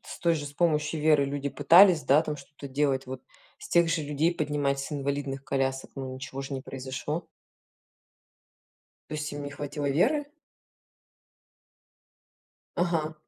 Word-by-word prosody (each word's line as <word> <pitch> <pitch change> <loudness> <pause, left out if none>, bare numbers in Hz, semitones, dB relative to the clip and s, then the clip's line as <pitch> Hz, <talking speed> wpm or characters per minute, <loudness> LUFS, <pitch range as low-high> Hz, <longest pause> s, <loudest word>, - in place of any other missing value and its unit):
С - - -9
той 170 -1 +3
же, 145 -2 -4
с 140 - -8
помощью 150 -1 +1
веры 150 -2 +4
люди 140 0 -3
пытались, 170 +4 +6
да, 145 +4 +4
там 150 -2 -4
что-то 140 0 -11
делать 135 -1 0
вот, 130 0 -7 0.4
с - - -10
тех 170 -1 +4
же 165 -2 0
людей 150 +4 +1
поднимать 145 -3 -1
с 140 - -5
инвалидных 140 -1 -3
колясок, 135 -1 -1
но 130 -1 -5
ничего 135 +1 -6
ж 135 - -8
не 135 -1 -3
произошло. 135 +5 -5 1.8
То - - -8
есть 150 0 -3
им 145 0 -5
не 145 - -5
хватило 145 0 -4
веры? 280 - +2 2.5
Ага. 165 -3 0
145 Hz, 150 wpm, -28 LUFS, 135-155 Hz, 2.5 s, пытались